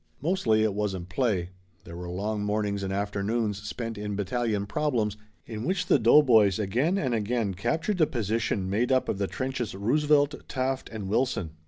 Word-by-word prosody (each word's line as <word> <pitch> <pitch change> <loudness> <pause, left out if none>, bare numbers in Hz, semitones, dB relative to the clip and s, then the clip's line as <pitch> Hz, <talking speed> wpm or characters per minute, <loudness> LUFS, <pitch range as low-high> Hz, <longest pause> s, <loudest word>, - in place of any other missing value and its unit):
Mostly 135 - +2
it 110 -2 +1
wasn't 95 -4 -3
play. 95 -5 0 0.3
There 85 - -10
were 90 0 -6
long 105 +4 -2
mornings 105 -1 -1
and 95 -1 -3
afternoons 100 +1 -1
spent 115 +1 -5
in 105 -1 -3
battalion 105 +1 -1
problems 115 -5 0 0.3
in 110 -1 -6
which 180 +4 0
the 145 - +4
doughboys 115 -5 +5
again 120 - +1
and 130 -10 0
again 110 -2 0
captured 160 - -1
the 155 - +5
position 110 -4 -1
made 110 +7 0
up 130 0 +2
of 95 - -1
the 100 - 0
trenches 130 -4 -3
Roosevelt, 145 +7 +2
Taft 130 0 -2
and 105 -4 -6
Wilson. 115 -6 0
110 Hz, 170 wpm, -27 LUFS, 100-130 Hz, 0.3 s, doughboys